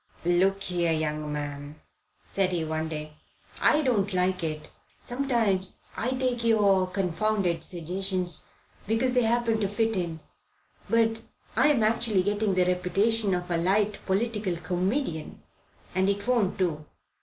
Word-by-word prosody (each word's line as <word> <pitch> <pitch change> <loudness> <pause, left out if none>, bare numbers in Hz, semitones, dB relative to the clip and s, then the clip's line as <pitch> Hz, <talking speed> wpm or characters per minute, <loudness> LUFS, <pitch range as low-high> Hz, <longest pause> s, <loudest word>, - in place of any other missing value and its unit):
"Look 190 +3 +2
here, 175 -3 0
young 155 -1 -1
man," 145 0 -5 0.5
said 195 -2 0
he 165 -2 -1
one 160 0 -2
day, 155 -1 -6 0.4
"I 305 0 +4
don't 205 -7 +1
like 180 0 +1
it. 155 -1 -4 0.3
Sometimes 235 -8 0
I 240 - -1
take 255 -2 -1
your 200 -5 +4
confounded 185 0 0
suggestions, 180 0 -2 0.4
because 235 +4 +1
they 250 - +4
happen 230 -1 +1
to 205 - +1
fit 220 +2 0
in; 170 -3 -2 0.7
but 225 -1 +2 0.3
I'm 285 -7 +4
actually 215 -3 +2
getting 205 0 0
the 180 -1 +3
reputation 195 +3 +1
of 180 0 -4
a 170 - +2
light 200 +4 +1
political 210 -1 0
comedian, 180 - -2 0.5
and 190 +1 +2
it 200 0 -1
won't 235 -7 +2
do." 165 -5 -1
190 Hz, 135 wpm, -27 LUFS, 175-225 Hz, 0.7 s, I